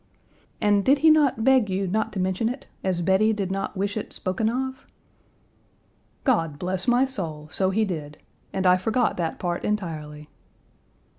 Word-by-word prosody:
"And 205 Hz, -1 st, +3 dB
did 275 Hz, +5 st, +4 dB
he 320 Hz, -, +9 dB
not 285 Hz, -7 st, +3 dB
beg 260 Hz, -4 st, +4 dB
you 190 Hz, +1 st, -1 dB
not 215 Hz, +4 st, -1 dB
to 200 Hz, -, -3 dB
mention 190 Hz, +4 st, 0 dB
it, 255 Hz, +2 st, -6 dB, 0.2 s
as 185 Hz, -2 st, 0 dB
Bettie 190 Hz, +5 st, +3 dB
did 195 Hz, -3 st, -3 dB
not 195 Hz, +1 st, -3 dB
wish 200 Hz, +1 st, -1 dB
it 215 Hz, -, -4 dB
spoken 195 Hz, +4 st, -1 dB
of?" 260 Hz, +2 st, -4 dB, 1.4 s
"God 165 Hz, -, +1 dB
bless 185 Hz, +2 st, -3 dB
my 245 Hz, +2 st, +4 dB
soul, 165 Hz, -, -3 dB
so 190 Hz, -1 st, +1 dB
he 215 Hz, +3 st, +1 dB
did. 150 Hz, -6 st, -5 dB, 0.3 s
And 190 Hz, 0 st, -2 dB
I 180 Hz, 0 st, +6 dB
forgot 225 Hz, +5 st, 0 dB
that 165 Hz, -2 st, -2 dB
part 175 Hz, -1 st, -3 dB
entirely." 155 Hz, -7 st, -4 dB
195 Hz, 165 wpm, -25 LUFS, 180-225 Hz, 1.4 s, he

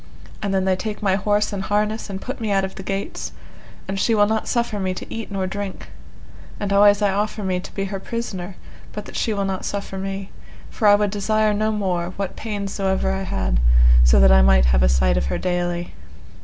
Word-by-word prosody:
And 200 Hz, -2 st, -2 dB
then 190 Hz, -1 st, +1 dB
they 190 Hz, -1 st, +2 dB
take 210 Hz, +2 st, -5 dB
my 195 Hz, -2 st, +3 dB
horse 205 Hz, +2 st, +1 dB
and 195 Hz, -, -3 dB
harness 210 Hz, +2 st, -1 dB
and 190 Hz, -1 st, -4 dB
put 255 Hz, +4 st, -6 dB
me 220 Hz, -, -2 dB
out 195 Hz, -1 st, +2 dB
of 190 Hz, -, -7 dB
the -, -, -8 dB
gates, 195 Hz, +1 st, -4 dB, 0.5 s
and 195 Hz, 0 st, -3 dB
she 225 Hz, +3 st, +2 dB
will 205 Hz, -1 st, +5 dB
not 220 Hz, +1 st, -1 dB
suffer 235 Hz, -3 st, -1 dB
me 185 Hz, -1 st, -1 dB
to -, -, -8 dB
eat 225 Hz, -1 st, -5 dB
nor 195 Hz, -2 st, -2 dB
drink; 195 Hz, 0 st, -5 dB, 0.7 s
and 200 Hz, -1 st, -1 dB
always 205 Hz, +1 st, +5 dB
I 200 Hz, -, +3 dB
offer 210 Hz, +2 st, -2 dB
me 185 Hz, -1 st, 0 dB
to -, -, -9 dB
be 195 Hz, -, -1 dB
her 195 Hz, 0 st, -4 dB
prisoner, 195 Hz, -5 st, -5 dB, 0.4 s
but 210 Hz, -1 st, -6 dB
that -, -, -11 dB
she 225 Hz, -, 0 dB
will 200 Hz, -2 st, -1 dB
not 190 Hz, -1 st, -3 dB
suffer 200 Hz, -1 st, -4 dB
me, 195 Hz, 0 st, -5 dB, 0.4 s
for 215 Hz, -, +1 dB
I 205 Hz, -, +8 dB
would 205 Hz, -1 st, 0 dB
desire 215 Hz, +1 st, +1 dB
no 215 Hz, +1 st, 0 dB
more, 185 Hz, -4 st, -2 dB
what 195 Hz, -2 st, -3 dB
pains 205 Hz, -3 st, -4 dB
so 195 Hz, -1 st, -2 dB
ever 190 Hz, 0 st, +1 dB
I 190 Hz, 0 st, -2 dB
had, 95 Hz, -, -1 dB, 0.4 s
so -, -, +5 dB
that 65 Hz, 0 st, +6 dB
I 65 Hz, 0 st, +6 dB
might 65 Hz, -1 st, +5 dB
have 60 Hz, 0 st, +3 dB
a 60 Hz, -, +4 dB
sight 60 Hz, -1 st, +2 dB
of 65 Hz, +2 st, 0 dB
her -, -, -1 dB
daily. 175 Hz, -1 st, -2 dB
195 Hz, 230 wpm, -22 LUFS, 185-210 Hz, 0.7 s, I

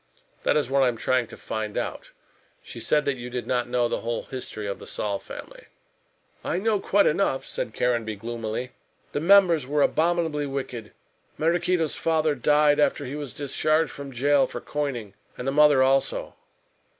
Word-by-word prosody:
"That -, -, +2 dB
is 145 Hz, -, +1 dB
what 135 Hz, +1 st, +2 dB
I 130 Hz, -, +5 dB
am 120 Hz, -2 st, -1 dB
trying 125 Hz, 0 st, +1 dB
to -, -, -11 dB
find 110 Hz, -1 st, -4 dB
out. -, -, -4 dB, 0.5 s
She -, -, -9 dB
said 150 Hz, -1 st, +2 dB
that 140 Hz, -2 st, 0 dB
you 120 Hz, 0 st, -7 dB
did 125 Hz, 0 st, -4 dB
not 120 Hz, -1 st, -1 dB
know 120 Hz, -1 st, +2 dB
the -, -, -2 dB
whole 115 Hz, 0 st, -3 dB
history 125 Hz, -5 st, -6 dB
of 100 Hz, -1 st, -4 dB
the -, -, -10 dB
Saul 100 Hz, -2 st, -2 dB
family." -, -, -11 dB, 0.8 s
"I -, -, -1 dB
know 210 Hz, +2 st, +1 dB
quite 200 Hz, +1 st, +3 dB
enough," 155 Hz, -5 st, +1 dB
said 110 Hz, -, -4 dB
Caranby 115 Hz, -3 st, 0 dB
gloomily, 115 Hz, +3 st, -4 dB, 0.4 s
"the -, -, -1 dB
members 170 Hz, -4 st, +5 dB
were 145 Hz, +1 st, +2 dB
abominably 160 Hz, -3 st, +1 dB
wicked. 125 Hz, -5 st, -5 dB, 0.5 s
Maraquito's 170 Hz, 0 st, +1 dB
father 160 Hz, -2 st, +1 dB
died 145 Hz, +2 st, +3 dB
after 145 Hz, -2 st, +2 dB
he 135 Hz, -, -5 dB
was 145 Hz, -4 st, -5 dB
discharged 155 Hz, +2 st, 0 dB
from 140 Hz, -1 st, -8 dB
jail 140 Hz, +3 st, +3 dB
for -, -, -6 dB
coining; 130 Hz, -9 st, -4 dB, 0.2 s
and 125 Hz, -, -6 dB
the -, -, +2 dB
mother 145 Hz, -2 st, +5 dB
also." 135 Hz, +1 st, +1 dB
140 Hz, 175 wpm, -25 LUFS, 120-150 Hz, 0.8 s, I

